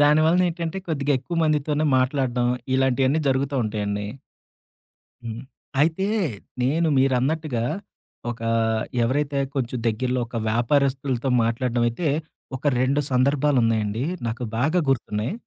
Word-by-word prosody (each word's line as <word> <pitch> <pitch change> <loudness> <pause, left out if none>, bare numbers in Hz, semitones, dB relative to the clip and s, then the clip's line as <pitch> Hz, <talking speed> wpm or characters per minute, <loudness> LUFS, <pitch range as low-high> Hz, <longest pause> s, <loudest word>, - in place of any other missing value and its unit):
దానివలన 155 +4 +5
ఏంటంటే, 170 +2 -4
కొద్దిగా 145 -3 0
ఎక్కువ 170 +6 -5
మందితోనే 150 0 +1
మాట్లాడడం, 130 -2 +1 0.3
ఇలాంటియన్ని 130 +3 +2
జరుగుతుంటాయండి. 110 -7 -1 1.2
హ్మ్. 115 +1 -6 0.4
అయితే 165 +5 +1 0.6
నేను 160 +6 +2
మీరన్నట్టుగా, 135 0 +1 0.7
ఒక 115 - -10 0.6
ఎవరైతే 140 +3 0 0.2
కొంచెం 125 -2 -1
దగ్గరలో, 125 +3 0
ఒక 115 - -5
వ్యాపారస్తులతో 130 +2 +1
మాట్లాడ్డమైతే, 120 +5 0 0.5
ఒక 130 - -18 0.2
2 135 +3 +2
సందర్భాలున్నాయండి. 125 -5 +2 0.2
నాకు 115 +2 -3
బాగా 155 +9 +2
గుర్తున్నాయి. 110 - -1
130 Hz, 95 wpm, -24 LUFS, 120-150 Hz, 1.2 s, దానివలన